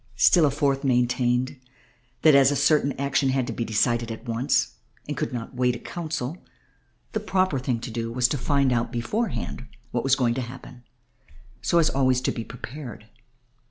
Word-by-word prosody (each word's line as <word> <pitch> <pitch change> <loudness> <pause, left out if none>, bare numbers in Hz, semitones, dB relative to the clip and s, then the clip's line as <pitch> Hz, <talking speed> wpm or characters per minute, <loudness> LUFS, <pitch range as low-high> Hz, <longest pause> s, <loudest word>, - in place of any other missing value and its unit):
Still 150 +7 +5
a - - +3
fourth 140 -1 0
maintained 125 0 +1 0.6
that 155 - +7
as 135 -1 +6
certain 145 -1 +3
action 140 0 0
had 130 -1 +1
to - - -4
be 115 - -2
decided 115 +1 +1
at 110 - -8
once 120 +1 0 0.3
and 145 - -3
could - - -2
not 120 +1 -5
wait 125 -1 +1
a - - -7
council 165 -2 -4 0.7
the 220 - -1
proper 185 -8 +1
thing 125 -2 -1
to 120 - -6
do 115 0 -3
was 125 +1 +2
to 145 - -1
find 140 -1 +2
out 120 -1 0
beforehand 125 - -3 0.2
what 120 - -1
was 135 -1 +4
going 120 -4 +1
to 130 - -2
happen 125 0 -9 0.8
so 170 - +1
as 165 -2 +4
to - - -3
be 135 - -1
always 130 -1 +3
prepared. 120 -1 -6
130 Hz, 180 wpm, -25 LUFS, 120-140 Hz, 0.8 s, that